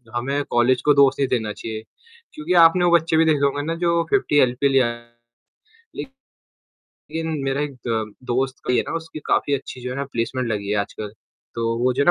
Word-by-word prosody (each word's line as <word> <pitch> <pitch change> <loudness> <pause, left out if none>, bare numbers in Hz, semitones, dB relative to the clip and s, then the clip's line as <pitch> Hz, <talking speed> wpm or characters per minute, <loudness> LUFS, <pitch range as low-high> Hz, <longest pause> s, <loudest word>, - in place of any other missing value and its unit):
हमें 135 +4 -1
कॉलेज 120 +1 +3
को 150 - +6
दोष 140 -1 +5
नहीं 135 - +2
देना 110 -4 -1
चाहिए 110 -1 -6 0.5
क्योंकि 305 - -2
आपने 175 +2 +4
वो 175 - +3
बच्चे 165 -1 0
भी 165 - +5
देखे 150 -3 +3
होंगे 140 +1 0
ना - - -1
जो 170 0 +2
50 195 -7 +2
एलपीए 130 +2 +2
ले 135 0 +4
आया, 120 -1 -2 1.8
लेकिन 160 +1 -7 0.2
मेरा 135 +1 -1
एक 150 -1 -3
द 110 -2 -2
दोस्त 130 +2 -1
की 125 - +2
है - - +2
ना - - -4
उसकी 160 -1 -6
काफ़ी 145 - +1
अच्छी 130 -2 -4
जो 125 - -5
है - - -4
ना 140 - -1
प्लेसमेंट 120 +2 -2
लगी 100 -2 -3
है 105 - +1
आजकल। 100 +1 -5 0.4
तो 115 0 -1
वो 125 +2 +1
जो 140 +3 +1
है - - -3
130 Hz, 210 wpm, -22 LUFS, 120-150 Hz, 1.8 s, को